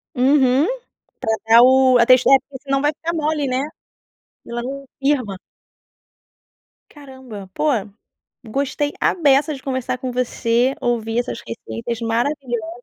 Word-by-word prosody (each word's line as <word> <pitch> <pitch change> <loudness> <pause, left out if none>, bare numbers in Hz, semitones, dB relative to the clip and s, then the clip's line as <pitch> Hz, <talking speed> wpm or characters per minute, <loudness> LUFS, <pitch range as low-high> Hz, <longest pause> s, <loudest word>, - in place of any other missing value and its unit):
Uhum 265 +1 +3 0.5
pra 220 0 0
dar 230 +1 +8
o 260 0 +5
a 235 - +5
tex 255 +1 +6
porque 270 0 +3
se 280 - -16
não 275 0 +2
vai 295 +1 +2
ficar 325 +2 -5
mole, 305 -2 -1
né. 255 0 0 0.9
Ela 235 0 -4
não 275 +2 -6
firma. 270 -8 0 1.5
Caramba, 260 -9 -11
pô, - - -2 0.8
gostei 280 +5 -2
à - - +2
beça 295 -2 +3
de 270 - -10
conversar 255 -1 -2
com 255 0 -4
você. 245 +1 0
Ouvir 230 -1 -1
essas 240 -1 -4
receitas 230 0 -5
maravilhosas 240 0 -2
260 Hz, 135 wpm, -20 LUFS, 235-275 Hz, 1.5 s, dar